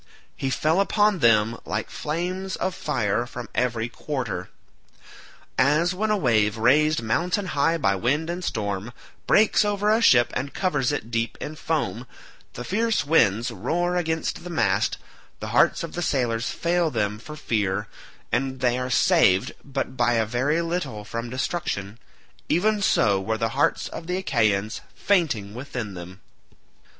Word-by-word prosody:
He 135 Hz, -, -2 dB
fell 155 Hz, +7 st, +2 dB
upon 205 Hz, -1 st, +2 dB
them 115 Hz, -2 st, +3 dB
like 105 Hz, +1 st, -4 dB
flames 180 Hz, +5 st, -3 dB
of 185 Hz, -, -2 dB
fire 120 Hz, -, -1 dB
from 120 Hz, -1 st, -7 dB
every 120 Hz, -2 st, 0 dB
quarter. 120 Hz, -8 st, -4 dB, 1.1 s
As 150 Hz, +7 st, +3 dB
when 215 Hz, +4 st, -1 dB
a 210 Hz, -, +2 dB
wave, 110 Hz, -, +2 dB
raised 150 Hz, +5 st, +3 dB
mountain 175 Hz, -, 0 dB
high 165 Hz, 0 st, +1 dB
by 135 Hz, -11 st, +2 dB
wind 140 Hz, +11 st, 0 dB
and 175 Hz, +2 st, -4 dB
storm, 105 Hz, -, -3 dB, 0.3 s
breaks 215 Hz, 0 st, +4 dB
over 205 Hz, 0 st, +1 dB
a 220 Hz, +2 st, +3 dB
ship 120 Hz, -, +5 dB
and 140 Hz, +2 st, -3 dB
covers 150 Hz, -9 st, 0 dB
it 120 Hz, -5 st, -4 dB
deep 115 Hz, 0 st, -1 dB
in 155 Hz, -, -6 dB
foam, 150 Hz, -6 st, -2 dB, 0.5 s
the 120 Hz, -, -6 dB
fierce 225 Hz, -, 0 dB
winds 120 Hz, -6 st, +3 dB
roar 175 Hz, +8 st, -1 dB
against 160 Hz, -2 st, -2 dB
the 180 Hz, -, -7 dB
mast, 170 Hz, -, +1 dB, 0.4 s
the -, -, -5 dB
hearts -, -, +3 dB
of -, -, -6 dB
the 175 Hz, -, -3 dB
sailors 120 Hz, -7 st, 0 dB
fail 170 Hz, -1 st, 0 dB
them 105 Hz, -5 st, -1 dB
for 150 Hz, +7 st, -9 dB
fear, 105 Hz, -7 st, -1 dB, 0.4 s
and 130 Hz, +1 st, -1 dB
they 125 Hz, 0 st, +1 dB
are 125 Hz, 0 st, -3 dB
saved 95 Hz, -5 st, +3 dB
but 135 Hz, -1 st, -4 dB
by 120 Hz, -1 st, +2 dB
a 115 Hz, -1 st, +2 dB
very 135 Hz, +9 st, 0 dB
little 150 Hz, -12 st, -3 dB
from 115 Hz, +3 st, -5 dB
destruction—even 145 Hz, -, -3 dB
so 100 Hz, -, +3 dB
were 110 Hz, +3 st, -1 dB
the 115 Hz, 0 st, 0 dB
hearts 135 Hz, +5 st, +1 dB
of 165 Hz, -, -8 dB
the 180 Hz, +1 st, -1 dB
Achaeans 110 Hz, -, 0 dB
fainting 140 Hz, -, 0 dB
within 120 Hz, -4 st, -5 dB
them. 90 Hz, +2 st, -10 dB
130 Hz, 155 wpm, -24 LUFS, 115-170 Hz, 1.1 s, ship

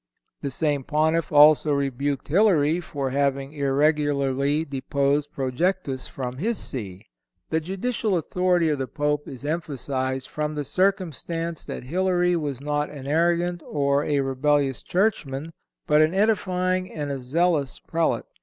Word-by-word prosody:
The 140 Hz, -, -2 dB
same 145 Hz, 0 st, 0 dB
Pontiff 160 Hz, +2 st, +1 dB
also 150 Hz, 0 st, +6 dB
rebuked 140 Hz, 0 st, -1 dB
Hilary 165 Hz, -3 st, +3 dB
for 145 Hz, -6 st, -4 dB
having 140 Hz, 0 st, 0 dB
irregularly 145 Hz, 0 st, +1 dB
deposed 140 Hz, +1 st, 0 dB
Projectus 135 Hz, +1 st, -1 dB
from 125 Hz, -1 st, -5 dB
his 220 Hz, -, -1 dB
See. 100 Hz, -8 st, -6 dB, 0.5 s
The 160 Hz, -, +2 dB
judicial 195 Hz, +4 st, -1 dB
authority 180 Hz, 0 st, +1 dB
of 150 Hz, -2 st, 0 dB
the 135 Hz, -, -2 dB
Pope 150 Hz, +1 st, -1 dB
is 135 Hz, +1 st, -8 dB
emphasized 135 Hz, -4 st, -2 dB
from 150 Hz, 0 st, -3 dB
the 145 Hz, -, -2 dB
circumstance 170 Hz, -2 st, -1 dB
that -, -, -6 dB
Hilary 180 Hz, +4 st, +1 dB
was 145 Hz, -6 st, -3 dB
not 150 Hz, +1 st, -1 dB
an 140 Hz, -3 st, -9 dB
arrogant 170 Hz, +3 st, +1 dB
or 140 Hz, -1 st, +1 dB
a 145 Hz, -2 st, +1 dB
rebellious 135 Hz, 0 st, +1 dB
churchman, 165 Hz, -7 st, -1 dB, 0.3 s
but 150 Hz, 0 st, +4 dB
an 155 Hz, +4 st, +2 dB
edifying 185 Hz, -3 st, +1 dB
and 145 Hz, -2 st, -4 dB
a 135 Hz, -, -3 dB
zealous 150 Hz, +2 st, 0 dB
Prelate. 165 Hz, 0 st, -1 dB
150 Hz, 135 wpm, -24 LUFS, 140-170 Hz, 0.5 s, also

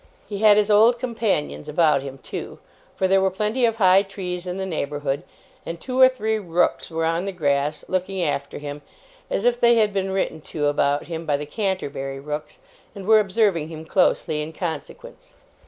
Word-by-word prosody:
He 200 Hz, -2 st, -5 dB
had 210 Hz, -1 st, +6 dB
his 210 Hz, 0 st, +2 dB
old 225 Hz, +4 st, +6 dB
companions 220 Hz, -12 st, -2 dB
about 150 Hz, -2 st, +3 dB
him, 135 Hz, 0 st, -8 dB
too; -, -, -7 dB, 0.4 s
for 190 Hz, -, +1 dB
there 195 Hz, +1 st, +4 dB
were 190 Hz, -, +3 dB
plenty 215 Hz, +6 st, 0 dB
of 225 Hz, -1 st, +1 dB
high 190 Hz, -3 st, +5 dB
trees 185 Hz, -2 st, -6 dB
in 180 Hz, +1 st, -3 dB
the 190 Hz, -, -3 dB
neighbourhood, 145 Hz, -5 st, -2 dB, 0.4 s
and 165 Hz, 0 st, -6 dB
two 255 Hz, +5 st, -3 dB
or 260 Hz, -, +9 dB
three 220 Hz, -4 st, -1 dB
rooks 175 Hz, -3 st, 0 dB
were 165 Hz, -1 st, -1 dB
on 165 Hz, +3 st, 0 dB
the 200 Hz, -, -2 dB
grass, 145 Hz, -3 st, -1 dB
looking 185 Hz, +1 st, -2 dB
after 140 Hz, -3 st, -2 dB
him, 145 Hz, 0 st, -7 dB, 0.5 s
as 200 Hz, -, -1 dB
if 245 Hz, 0 st, +3 dB
they 235 Hz, 0 st, +5 dB
had 215 Hz, -3 st, +2 dB
been 195 Hz, -1 st, -1 dB
written 190 Hz, -4 st, -2 dB
to 150 Hz, 0 st, -3 dB
about 145 Hz, 0 st, +1 dB
him 165 Hz, -1 st, -6 dB
by 145 Hz, -1 st, +2 dB
the 150 Hz, -, -5 dB
Canterbury 145 Hz, -7 st, -3 dB
rooks, 150 Hz, +1 st, -6 dB, 0.4 s
and 195 Hz, -2 st, -8 dB
were 220 Hz, +1 st, +6 dB
observing 195 Hz, -5 st, +1 dB
him 160 Hz, -1 st, -8 dB
closely 160 Hz, -3 st, +1 dB
in 155 Hz, +2 st, -6 dB
consequence. 160 Hz, -4 st, -7 dB
180 Hz, 190 wpm, -23 LUFS, 150-205 Hz, 0.5 s, or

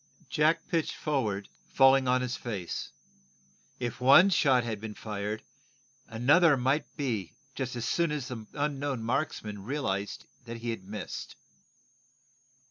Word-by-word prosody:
Jack 155 Hz, +2 st, +2 dB
pitched 165 Hz, -2 st, -1 dB
forward, 110 Hz, -10 st, -1 dB, 0.3 s
falling 135 Hz, 0 st, +6 dB
upon 125 Hz, 0 st, +3 dB
his 125 Hz, -1 st, -2 dB
face. 105 Hz, -6 st, -4 dB, 0.9 s
If 120 Hz, 0 st, -4 dB
one 140 Hz, +10 st, +7 dB
shot 135 Hz, -7 st, +4 dB
had 110 Hz, -3 st, -4 dB
been 110 Hz, -1 st, -6 dB
fired, 105 Hz, 0 st, -4 dB, 0.6 s
another 140 Hz, +7 st, +4 dB
might 130 Hz, +7 st, 0 dB
be 115 Hz, -, -2 dB, 0.3 s
as 125 Hz, -3 st, -3 dB
soon 170 Hz, +5 st, +1 dB
as 145 Hz, -4 st, -3 dB
the 115 Hz, -4 st, -7 dB
unknown 145 Hz, -4 st, -2 dB
marksman 110 Hz, -5 st, -2 dB
realized 105 Hz, -6 st, -3 dB, 0.2 s
that 115 Hz, 0 st, -6 dB
he 115 Hz, 0 st, -3 dB
had 115 Hz, -4 st, -6 dB
missed. 100 Hz, -1 st, -6 dB
125 Hz, 130 wpm, -29 LUFS, 110-140 Hz, 0.9 s, one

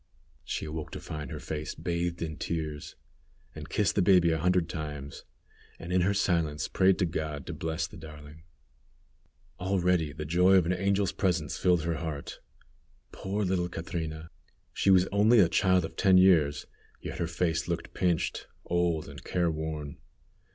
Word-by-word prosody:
She -, -, -4 dB
awoke 80 Hz, 0 st, -5 dB
to -, -, -5 dB
find 75 Hz, -3 st, -6 dB
her -, -, -5 dB
face 75 Hz, -1 st, -5 dB
bathed 85 Hz, 0 st, -2 dB
in 80 Hz, -2 st, -5 dB
tears, 75 Hz, -3 st, -4 dB, 0.6 s
and -, -, -9 dB
kissed 105 Hz, -5 st, +1 dB
the 100 Hz, -, +2 dB
baby 90 Hz, -2 st, +5 dB
a 80 Hz, -, 0 dB
hundred 90 Hz, 0 st, +2 dB
times, 75 Hz, -4 st, -6 dB, 0.5 s
and 85 Hz, +2 st, -6 dB
in 90 Hz, -, +3 dB
her 95 Hz, +3 st, +2 dB
silence 85 Hz, -6 st, 0 dB
prayed 95 Hz, -2 st, +2 dB
God 75 Hz, -3 st, -4 dB
to -, -, -5 dB
bless 80 Hz, +1 st, -2 dB
the -, -, -11 dB
darling. 75 Hz, -1 st, -11 dB, 1.2 s
Already 90 Hz, -4 st, +1 dB
the 75 Hz, +1 st, -6 dB
joy 90 Hz, +5 st, +4 dB
of 90 Hz, -3 st, +5 dB
an 90 Hz, -, +1 dB
angel's 100 Hz, +1 st, +1 dB
presence 85 Hz, -6 st, -1 dB
filled 90 Hz, -3 st, +3 dB
her 85 Hz, -1 st, -1 dB
heart. 80 Hz, -4 st, -5 dB, 0.7 s
Poor 100 Hz, +2 st, -3 dB
little 90 Hz, -1 st, 0 dB
Catrina! 80 Hz, -2 st, -5 dB, 0.4 s
She -, -, +1 dB
was 95 Hz, -1 st, +6 dB
only 105 Hz, +4 st, +5 dB
a 95 Hz, -, +6 dB
child 90 Hz, +1 st, +2 dB
of -, -, -9 dB
ten 95 Hz, -1 st, +5 dB
years, 85 Hz, -6 st, +4 dB, 0.3 s
yet -, -, -7 dB
her 85 Hz, -, 0 dB
face 85 Hz, 0 st, -1 dB
looked 85 Hz, -1 st, -4 dB
pinched, 90 Hz, -3 st, -1 dB, 0.2 s
old, 85 Hz, -2 st, 0 dB
and 70 Hz, -1 st, -10 dB
careworn. 80 Hz, -4 st, -2 dB
85 Hz, 160 wpm, -29 LUFS, 80-90 Hz, 1.2 s, was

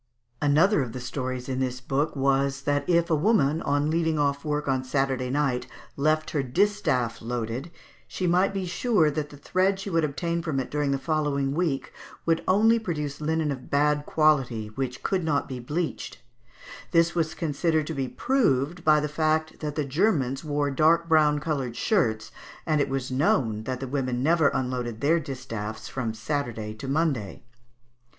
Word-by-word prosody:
Another 155 Hz, +6 st, +4 dB
of 120 Hz, -4 st, -4 dB
the 125 Hz, -, -5 dB
stories 125 Hz, 0 st, -4 dB
in 130 Hz, -1 st, -2 dB
this 125 Hz, -1 st, -2 dB
book 140 Hz, +4 st, -1 dB
was, 135 Hz, 0 st, +1 dB
that 145 Hz, +1 st, 0 dB
if 170 Hz, -1 st, +3 dB
a -, -, +5 dB
woman, 155 Hz, -3 st, +2 dB
on 145 Hz, +2 st, +1 dB
leaving 160 Hz, -1 st, +1 dB
off 140 Hz, -1 st, 0 dB
work 150 Hz, -1 st, -2 dB
on 130 Hz, -1 st, +1 dB
Saturday 130 Hz, -1 st, -1 dB
night, 135 Hz, -3 st, 0 dB, 0.3 s
left 155 Hz, +2 st, +1 dB
her 150 Hz, -, 0 dB
distaff 130 Hz, -, 0 dB
loaded, 120 Hz, +5 st, -4 dB, 0.4 s
she 185 Hz, -, -3 dB
might 180 Hz, +3 st, +3 dB
be 195 Hz, -1 st, -3 dB
sure 175 Hz, -3 st, +2 dB
that 150 Hz, 0 st, -3 dB
the 145 Hz, -, -12 dB
thread 185 Hz, +6 st, +1 dB
she 195 Hz, 0 st, -5 dB
would 165 Hz, -1 st, +2 dB
obtain 170 Hz, +3 st, -1 dB
from 155 Hz, -5 st, -2 dB
it 130 Hz, -, -4 dB
during 150 Hz, -1 st, 0 dB
the 140 Hz, -, +1 dB
following 140 Hz, -1 st, 0 dB
week 155 Hz, -4 st, -1 dB, 0.3 s
would 165 Hz, 0 st, +1 dB
only 225 Hz, +5 st, +4 dB
produce 150 Hz, -8 st, -4 dB
linen 155 Hz, 0 st, 0 dB
of 130 Hz, -2 st, -7 dB
bad 150 Hz, +1 st, +2 dB
quality, 135 Hz, -8 st, +2 dB
which 125 Hz, 0 st, -4 dB
could 190 Hz, -2 st, 0 dB
not 145 Hz, -3 st, 0 dB
be 130 Hz, -2 st, -6 dB
bleached; 150 Hz, +7 st, -3 dB, 0.7 s
this 165 Hz, 0 st, +3 dB
was 160 Hz, -2 st, -1 dB
considered 160 Hz, 0 st, 0 dB
to 160 Hz, -, -4 dB
be 135 Hz, -3 st, -2 dB
proved 175 Hz, -, 0 dB
by 155 Hz, -1 st, +5 dB
the 150 Hz, -, -1 dB
fact 155 Hz, +1 st, 0 dB
that 150 Hz, -2 st, -4 dB
the 150 Hz, -, -1 dB
Germans 135 Hz, -, +1 dB
wore 145 Hz, -2 st, -1 dB
dark 160 Hz, +4 st, +3 dB
brown 155 Hz, -2 st, +4 dB
coloured 140 Hz, -6 st, -2 dB
shirts, 120 Hz, -, 0 dB, 0.3 s
and 155 Hz, -3 st, +2 dB
it 140 Hz, -, 0 dB
was 135 Hz, -1 st, -3 dB
known 115 Hz, -5 st, +1 dB
that 130 Hz, -1 st, -3 dB
the 135 Hz, -, -4 dB
women 130 Hz, -2 st, -1 dB
never 160 Hz, 0 st, +4 dB
unloaded 125 Hz, -4 st, -2 dB
their 160 Hz, +6 st, +3 dB
distaffs 120 Hz, -7 st, -6 dB
from 115 Hz, -4 st, -3 dB
Saturday 115 Hz, -4 st, -3 dB
to 110 Hz, +5 st, -8 dB
Monday. 135 Hz, -8 st, -1 dB
145 Hz, 175 wpm, -26 LUFS, 130-160 Hz, 0.7 s, a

